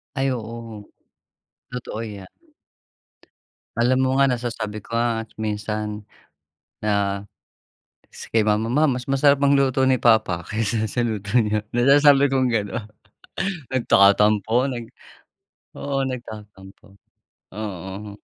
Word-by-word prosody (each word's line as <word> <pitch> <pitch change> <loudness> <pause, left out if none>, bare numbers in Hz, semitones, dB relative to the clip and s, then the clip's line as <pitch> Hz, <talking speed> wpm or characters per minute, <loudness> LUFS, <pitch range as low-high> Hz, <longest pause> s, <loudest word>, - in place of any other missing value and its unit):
Ay 135 -1 0
oo. 115 -3 -7 0.9
Totoo 125 -3 -5
'yan. 100 -4 -9 1.5
Alam 125 +2 +3
mo 130 - +2
nga, 140 - +5
nasasabi 115 -4 -3
ko 115 - -5
nga 115 -1 0
at 110 - -26
minsan 105 0 -3 0.8
na 100 -2 0 0.9
si - - -9
kay 115 - +4
mama, 105 +1 +1
"Ma 150 +2 +4
mas 125 -1 -2
masarap 140 +1 +3
magluto 140 -2 +3
ni 130 -1 +2
papa 110 -7 +3
kaysa 110 0 -1
sa 120 +3 0
luto 105 -1 -1
niyo." 105 -2 +1
Nasasabi 140 +3 +5
kong 130 -2 +2
gano'n. 105 -1 -2 0.9
Nagtatampo, 105 0 +4
nag 120 -2 -5 0.9
oo, 140 -1 -1
nagtatampo, 105 -5 -9 0.6
oo. 100 0 -7
115 Hz, 110 wpm, -22 LUFS, 105-130 Hz, 1.5 s, nga